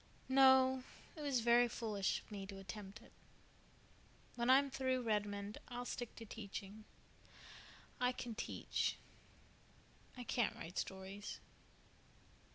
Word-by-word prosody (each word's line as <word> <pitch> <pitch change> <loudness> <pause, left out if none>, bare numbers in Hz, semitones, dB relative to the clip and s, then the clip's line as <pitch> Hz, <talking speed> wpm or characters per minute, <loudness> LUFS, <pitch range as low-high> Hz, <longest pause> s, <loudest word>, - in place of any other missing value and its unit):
"No. 260 -1 +6 0.3
It 310 - -7
was 275 -5 +1
very 240 +1 +6
foolish 215 -4 -1
of - - -21
me 195 -2 -5
to 195 -1 -7
attempt 200 +2 -8
it. - - -17 1.2
When 240 0 0
I'm 275 +1 +6
through 260 -1 0
Redmond 205 -2 -1
I'll 245 0 -5
stick 245 -1 -4
to 230 - -8
teaching. 210 0 -7 1.1
I 250 0 +3
can 245 -2 -5
teach. - - -1 1.2
I 250 - -5
can't 240 -1 +1
write 170 +3 -5
stories." 190 +2 -5
230 Hz, 120 wpm, -39 LUFS, 205-255 Hz, 1.2 s, No